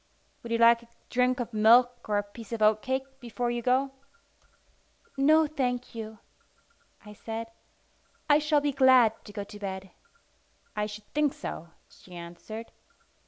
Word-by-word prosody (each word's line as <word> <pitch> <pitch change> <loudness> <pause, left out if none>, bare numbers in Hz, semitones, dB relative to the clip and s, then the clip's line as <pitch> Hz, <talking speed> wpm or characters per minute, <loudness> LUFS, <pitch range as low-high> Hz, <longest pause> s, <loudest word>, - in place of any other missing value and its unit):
"Would 235 - -8
you 230 - +2
like 235 0 +6
a 235 - -18 0.2
drink 250 +1 +2
of 240 -1 -4
milk 240 +3 +4
or 205 - +2
a 205 - +1
piece 205 +2 -12
of 230 - -3
oatcake 220 +5 +2 0.2
before 240 0 -3
you 240 0 -2
go?" 260 +3 +1 1.2
"No, 310 +3 +5
thank 250 -5 -2
you," 220 -1 -7 0.9
I 210 - -10
said. 225 +2 -6 0.8
"I 295 0 +5
shall 300 -1 +2
be 290 0 0
glad 260 -4 +4
to - - -10
go 205 -1 -5
to 205 +1 -12
bed." 190 -1 -6 0.8
"I 210 0 -1
should 210 0 -9
think 295 -2 +1
so," 170 - -7 0.2
she 180 - -16
answered. 175 +7 -9
235 Hz, 155 wpm, -28 LUFS, 215-255 Hz, 1.2 s, like